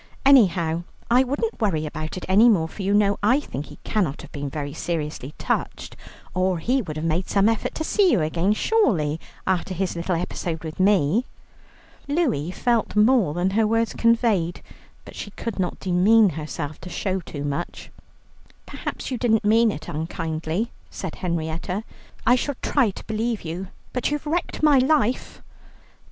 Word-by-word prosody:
Anyhow 175 Hz, -11 st, +5 dB, 0.3 s
I 250 Hz, +2 st, +6 dB
wouldn't 285 Hz, -, -2 dB
worry 165 Hz, -8 st, +1 dB
about 155 Hz, +2 st, -5 dB
it -, -, -5 dB
any 210 Hz, +6 st, +6 dB
more, 170 Hz, -8 st, +3 dB
for 180 Hz, -, -9 dB
you 195 Hz, +1 st, 0 dB
know 205 Hz, -1 st, +3 dB
I 245 Hz, +7 st, +4 dB
think 150 Hz, -, -6 dB
he -, -, -12 dB
cannot 180 Hz, -10 st, -1 dB
have -, -, -12 dB
been 145 Hz, -1 st, -4 dB
very 145 Hz, 0 st, -4 dB
seriously 150 Hz, -4 st, -4 dB
touched, -, -, -3 dB, 0.4 s
or 185 Hz, 0 st, +1 dB
he 250 Hz, +11 st, +1 dB
would 155 Hz, -8 st, -6 dB
have 155 Hz, -, -3 dB
made 165 Hz, +3 st, 0 dB
some 200 Hz, 0 st, +3 dB
effort 225 Hz, -1 st, 0 dB
to 315 Hz, -, -2 dB
see 385 Hz, +2 st, +3 dB
you 220 Hz, -, +3 dB
again, 170 Hz, +6 st, +1 dB
surely, 185 Hz, -, +1 dB, 0.3 s
after 185 Hz, 0 st, 0 dB
his 185 Hz, 0 st, -1 dB
little 170 Hz, +1 st, -1 dB
episode 165 Hz, -1 st, -3 dB
with 160 Hz, +1 st, -7 dB
me." 195 Hz, -, +3 dB, 0.8 s
Louie 280 Hz, -, 0 dB
felt 235 Hz, +4 st, 0 dB
more 210 Hz, -, +4 dB
than 180 Hz, +2 st, +1 dB
her 215 Hz, +2 st, +2 dB
words 225 Hz, +1 st, +1 dB
conveyed, 225 Hz, -7 st, +2 dB, 0.4 s
but -, -, -11 dB
she -, -, -6 dB
could 215 Hz, 0 st, -6 dB
not 180 Hz, -1 st, -1 dB
demean 200 Hz, +4 st, +4 dB
herself 155 Hz, -1 st, -5 dB
to 180 Hz, -, -8 dB
show 190 Hz, +1 st, -2 dB
too 145 Hz, -5 st, -7 dB
much. 145 Hz, +4 st, -4 dB, 0.7 s
"Perhaps -, -, -6 dB
you 250 Hz, -, -2 dB
didn't 225 Hz, -4 st, +2 dB
mean 225 Hz, +1 st, +5 dB
it 155 Hz, -, -8 dB
unkindly," 160 Hz, +5 st, -3 dB, 0.2 s
said 190 Hz, -4 st, -6 dB
Henrietta; 170 Hz, +3 st, -3 dB, 0.4 s
"I 240 Hz, -, +6 dB
shall 280 Hz, +2 st, -2 dB
try 265 Hz, -7 st, +3 dB
to 195 Hz, -, -9 dB
believe 225 Hz, +1 st, -2 dB
you, 170 Hz, +4 st, -5 dB, 0.3 s
but 250 Hz, -, 0 dB
you've 295 Hz, +1 st, -3 dB
wrecked 320 Hz, +1 st, -2 dB
my 295 Hz, -3 st, +6 dB
life." 255 Hz, -3 st, +1 dB
190 Hz, 170 wpm, -24 LUFS, 165-230 Hz, 0.8 s, I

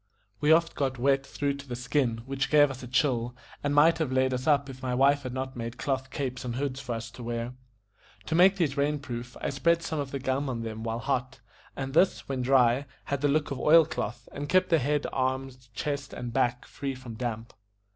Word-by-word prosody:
We 150 Hz, +1 st, +3 dB
oft 165 Hz, +1 st, +4 dB
got 135 Hz, -2 st, -1 dB
wet 135 Hz, +2 st, +2 dB
through 140 Hz, 0 st, -2 dB
to 140 Hz, 0 st, -11 dB
the 125 Hz, -, -4 dB
skin, 125 Hz, -2 st, 0 dB
which 135 Hz, 0 st, -2 dB
gave 145 Hz, -1 st, +5 dB
us 130 Hz, -, -8 dB
a 125 Hz, -, -7 dB
chill, 125 Hz, -2 st, +1 dB, 0.3 s
and 145 Hz, 0 st, 0 dB
might 160 Hz, +3 st, +5 dB
have 155 Hz, -5 st, 0 dB
laid 130 Hz, 0 st, +2 dB
us 125 Hz, +2 st, -3 dB
up 140 Hz, -2 st, +3 dB
if 130 Hz, -1 st, -9 dB
my 125 Hz, -1 st, -1 dB
wife 140 Hz, +2 st, +4 dB
had 130 Hz, -2 st, -5 dB
not 130 Hz, +1 st, -4 dB
made 115 Hz, 0 st, -5 dB
cloth 130 Hz, -2 st, -2 dB
capes 130 Hz, -2 st, -4 dB
and 120 Hz, -2 st, -3 dB
hoods 135 Hz, 0 st, -2 dB
for 125 Hz, -3 st, -4 dB
us 115 Hz, 0 st, -6 dB
to 125 Hz, -, -11 dB
wear. 120 Hz, +1 st, -3 dB, 0.7 s
To -, -, -3 dB
make 185 Hz, +4 st, +6 dB
these 160 Hz, -8 st, 0 dB
rain 145 Hz, +1 st, +1 dB
proof, 120 Hz, -3 st, -7 dB
I -, -, -1 dB
spread 170 Hz, +4 st, +2 dB
some 160 Hz, -2 st, -2 dB
of 140 Hz, -2 st, -3 dB
the 140 Hz, -, -3 dB
gum 135 Hz, +1 st, -1 dB
on 115 Hz, -3 st, -3 dB
them 110 Hz, -1 st, -5 dB
while 115 Hz, 0 st, -2 dB
hot, 125 Hz, +2 st, -2 dB, 0.4 s
and 135 Hz, -1 st, -4 dB
this, 180 Hz, +5 st, +3 dB
when 135 Hz, -2 st, -2 dB
dry, 130 Hz, +1 st, +3 dB, 0.2 s
had 140 Hz, -1 st, -3 dB
the 145 Hz, -, +3 dB
look 145 Hz, +1 st, +1 dB
of 135 Hz, -, -3 dB
oil 160 Hz, +3 st, +6 dB
cloth, 120 Hz, -6 st, -5 dB
and 145 Hz, +1 st, -5 dB
kept 185 Hz, 0 st, +3 dB
the 165 Hz, -3 st, +4 dB
head, 145 Hz, +2 st, 0 dB
arms, 130 Hz, -1 st, -2 dB
chest, 140 Hz, -2 st, -3 dB
and 120 Hz, -1 st, -5 dB
back 125 Hz, -1 st, +1 dB
free 135 Hz, -1 st, -5 dB
from 125 Hz, -2 st, -9 dB
damp. 115 Hz, -1 st, -4 dB
135 Hz, 230 wpm, -28 LUFS, 125-145 Hz, 0.7 s, make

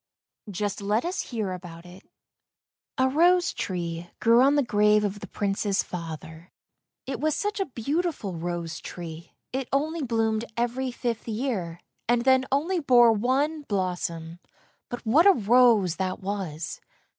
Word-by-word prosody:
Just 205 Hz, +1 st, -3 dB
let 210 Hz, +6 st, 0 dB
us 360 Hz, +2 st, -1 dB
hear 220 Hz, -6 st, -2 dB
about 175 Hz, -2 st, -9 dB
it. 180 Hz, +2 st, -13 dB, 1.0 s
A 260 Hz, -1 st, +3 dB
rose 350 Hz, +6 st, +3 dB
tree 175 Hz, -2 st, -4 dB
grew 230 Hz, +1 st, +5 dB
on 275 Hz, +2 st, +5 dB
the 290 Hz, -, +3 dB
grave 210 Hz, -2 st, +3 dB
of 205 Hz, 0 st, -2 dB
the 200 Hz, -, -8 dB
Prince's 200 Hz, +1 st, -1 dB
father, 165 Hz, -1 st, -8 dB, 0.6 s
it 265 Hz, -, -4 dB
was 310 Hz, 0 st, +1 dB
such 415 Hz, 0 st, -2 dB
a 390 Hz, -, 0 dB
beautiful 275 Hz, -, -2 dB
rose 170 Hz, -1 st, -4 dB
tree; 165 Hz, -1 st, -9 dB, 0.2 s
it 265 Hz, -1 st, -3 dB
only 310 Hz, +4 st, 0 dB
bloomed 225 Hz, -3 st, 0 dB
every 245 Hz, +2 st, -1 dB
fifth 240 Hz, -2 st, -3 dB
year, 215 Hz, -8 st, -3 dB, 0.3 s
and 240 Hz, 0 st, +3 dB
then 260 Hz, 0 st, +4 dB
only 330 Hz, +7 st, +1 dB
bore 245 Hz, -5 st, +6 dB
one 265 Hz, +8 st, +1 dB
blossom; 175 Hz, -, -3 dB, 0.5 s
but 245 Hz, -, -6 dB
what 295 Hz, -, +5 dB
a 400 Hz, -, +8 dB
rose 225 Hz, -, +4 dB
that 185 Hz, -1 st, -2 dB
was! 190 Hz, -5 st, -4 dB
220 Hz, 145 wpm, -26 LUFS, 180-265 Hz, 1.0 s, a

